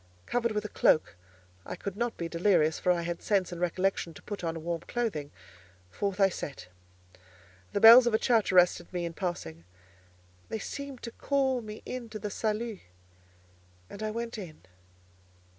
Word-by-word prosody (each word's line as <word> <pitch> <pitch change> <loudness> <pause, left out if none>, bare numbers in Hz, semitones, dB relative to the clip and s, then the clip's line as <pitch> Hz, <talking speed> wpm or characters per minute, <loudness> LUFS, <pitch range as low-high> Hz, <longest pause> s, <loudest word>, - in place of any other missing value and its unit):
Covered 235 -2 0
with 210 0 -2
a - - -4
cloak 155 - +3 0.5
(I - - -6
could 200 -2 -6
not 235 +2 -2
be 170 - -3
delirious, 170 -2 +2
for 180 - +2
I 170 -1 0
had 170 0 -4
sense 195 -3 +1
and 175 0 -6
recollection 180 -1 0
to - - -13
put 205 -3 -6
on 165 -1 -3
warm 170 0 -2
clothing), 185 -9 -3 0.6
forth 200 - -2
I 195 - +6
set. 135 - -7 1.0
The 200 - 0
bells 235 +2 +10
of 240 - +1
a - - +5
church 225 -4 +2
arrested 180 -1 +4
me 175 -2 -2
in 170 - -4
passing; 160 - -4 0.9
they - - -2
seemed 275 +4 -7
to 235 - -5
call 265 -1 0
me 215 -1 -9
in 250 -2 -6
to 215 - -6
the 210 -1 -5
salut, 220 0 -2 1.1
and 200 - -9
I 215 - -1
went 230 +1 -4
in. 165 - -10
200 Hz, 175 wpm, -29 LUFS, 170-230 Hz, 1.1 s, bells